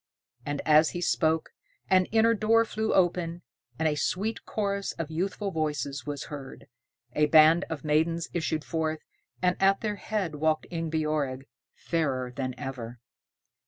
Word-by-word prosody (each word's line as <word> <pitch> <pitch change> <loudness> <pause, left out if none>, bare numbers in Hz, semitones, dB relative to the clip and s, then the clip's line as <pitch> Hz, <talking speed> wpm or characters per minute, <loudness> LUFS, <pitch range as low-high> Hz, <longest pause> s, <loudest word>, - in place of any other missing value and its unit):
And 145 -1 -2
as 155 0 +6
he - - -2
spoke, 160 -2 +1 0.4
an 185 0 +4
inner 225 +2 +3
door 225 +1 +3
flew 220 0 -2
open, 175 -2 +1 0.3
and 160 - +1
a 155 - +2
sweet 200 +9 -2
chorus 200 -2 -2
of 160 -1 -5
youthful 195 +4 -2
voices 145 -4 -2
was 145 -2 -3
heard. 140 -3 -9 0.5
A 150 0 +3
band 160 +3 +6
of 155 -4 -5
maidens 160 +2 +1
issued 160 -2 -1
forth, 160 -1 -2 0.4
and 180 -1 +3
at 195 0 +4
their 210 -2 -2
head 200 -8 -2
walked 155 +1 +1
Ingebjorg, 155 -5 -1 0.3
fairer 130 -7 -1
than 130 -2 -3
ever. 125 -4 -6
160 Hz, 145 wpm, -28 LUFS, 150-185 Hz, 0.5 s, as